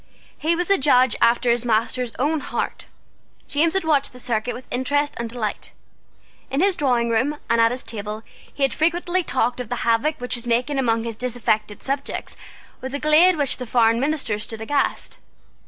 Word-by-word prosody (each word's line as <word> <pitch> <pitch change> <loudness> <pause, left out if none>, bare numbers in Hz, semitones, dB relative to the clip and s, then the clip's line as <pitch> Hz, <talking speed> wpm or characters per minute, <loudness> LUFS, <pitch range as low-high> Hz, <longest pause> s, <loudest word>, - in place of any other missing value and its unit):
He 325 +3 0
was 355 +2 -1
a 395 - +4
judge 255 -4 +4
after 235 +1 +4
his 240 0 +1
master's 235 +1 0
own 300 +4 +1
heart. - - -4 0.6
James 325 +4 +1
had 385 - +1
watched 290 -5 +1
the 250 - -10
circuit 240 -1 -2
with 255 - -9
interest 285 +4 0
and 235 -1 -3
delight. 225 -3 -4 0.8
In 270 - -1
his 385 +2 +3
drawingroom 250 0 +1
and 230 0 +3
at 230 - +5
his 250 +2 -5
table 215 0 -6 0.3
he 280 - -3
had 270 - +2
frequently 350 +3 +1
talked 250 -4 0
of 245 -3 -5
the 245 - -3
havoc 235 +7 +1
which 250 0 -3
was 240 0 -6
making 250 +4 +1
among 230 -3 +1
his 230 -1 -5
disaffected 215 -3 -1
subjects 275 +1 -4 0.5
with 260 +2 -5
a - - -2
glee 305 +4 +6
at 365 - +1
which 285 -3 0
the 250 - -6
foreign 230 -1 +3
ministers 265 -7 0
stood 225 +1 -6
aghast. 280 +6 -1
250 Hz, 190 wpm, -22 LUFS, 230-290 Hz, 0.8 s, glee